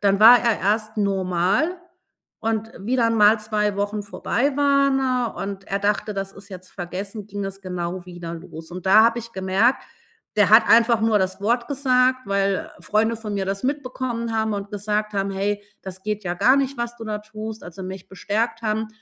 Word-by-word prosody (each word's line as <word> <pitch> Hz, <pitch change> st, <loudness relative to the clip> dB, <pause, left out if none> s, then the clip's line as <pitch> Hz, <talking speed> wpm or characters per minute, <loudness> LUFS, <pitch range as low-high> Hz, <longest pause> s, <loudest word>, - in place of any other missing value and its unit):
dann 200 Hz, -1 st, +2 dB
war 235 Hz, +3 st, +10 dB
er 230 Hz, -2 st, +1 dB
erst 215 Hz, +2 st, 0 dB
normal. 195 Hz, -, 0 dB, 0.6 s
Und 225 Hz, 0 st, -2 dB
wie 235 Hz, +7 st, -1 dB
dann 230 Hz, -2 st, +2 dB
mal 215 Hz, 0 st, +5 dB
2 210 Hz, -1 st, -1 dB
Wochen 205 Hz, +1 st, -2 dB
vorbei 265 Hz, +6 st, -1 dB
waren, 280 Hz, -1 st, +3 dB, 0.4 s
äh, -, -, -3 dB
und 195 Hz, -1 st, -5 dB
er 195 Hz, -, -1 dB
dachte: 210 Hz, +1 st, 0 dB
„Das 195 Hz, 0 st, -4 dB
ist 200 Hz, +1 st, -14 dB
jetzt 185 Hz, -1 st, -11 dB
vergessen“, 195 Hz, +3 st, -6 dB
ging 205 Hz, -1 st, -5 dB
das 195 Hz, 0 st, -6 dB
genau 180 Hz, -1 st, -4 dB
wieder 175 Hz, -2 st, -7 dB
los. 165 Hz, 0 st, -10 dB
Und 180 Hz, +1 st, -8 dB
da 215 Hz, +3 st, +7 dB
habe 230 Hz, +1 st, +2 dB
ich 230 Hz, 0 st, -11 dB
gemerkt, 195 Hz, +6 st, +1 dB, 0.5 s
der 205 Hz, -3 st, +5 dB
hat 220 Hz, +1 st, +7 dB
einfach 230 Hz, 0 st, +5 dB
nur 220 Hz, -1 st, +3 dB
das 190 Hz, 0 st, -2 dB
Wort 235 Hz, +5 st, 0 dB
gesagt, 255 Hz, -2 st, +2 dB
weil 195 Hz, -1 st, 0 dB
Freunde 220 Hz, +2 st, +1 dB
von 215 Hz, -2 st, -6 dB
mir 195 Hz, -1 st, -1 dB
das 195 Hz, +2 st, -3 dB
mitbekommen 255 Hz, -4 st, -3 dB
haben 220 Hz, -1 st, 0 dB
und 200 Hz, 0 st, -5 dB
gesagt 210 Hz, +1 st, -2 dB
haben: 195 Hz, 0 st, -1 dB
„Hey, 205 Hz, +1 st, -2 dB, 0.2 s
das 190 Hz, 0 st, -8 dB
geht 210 Hz, -1 st, -3 dB
ja 175 Hz, -, -2 dB
gar 230 Hz, +9 st, +4 dB
nicht, 275 Hz, 0 st, 0 dB
was 235 Hz, 0 st, -3 dB
du 225 Hz, -, -8 dB
da 210 Hz, -1 st, -3 dB
tust“, 215 Hz, +1 st, -8 dB
also 180 Hz, +2 st, -9 dB
mich 190 Hz, 0 st, -8 dB
bestärkt 225 Hz, +4 st, -2 dB
haben, 220 Hz, 0 st, -1 dB
210 Hz, 195 wpm, -23 LUFS, 195-230 Hz, 0.6 s, war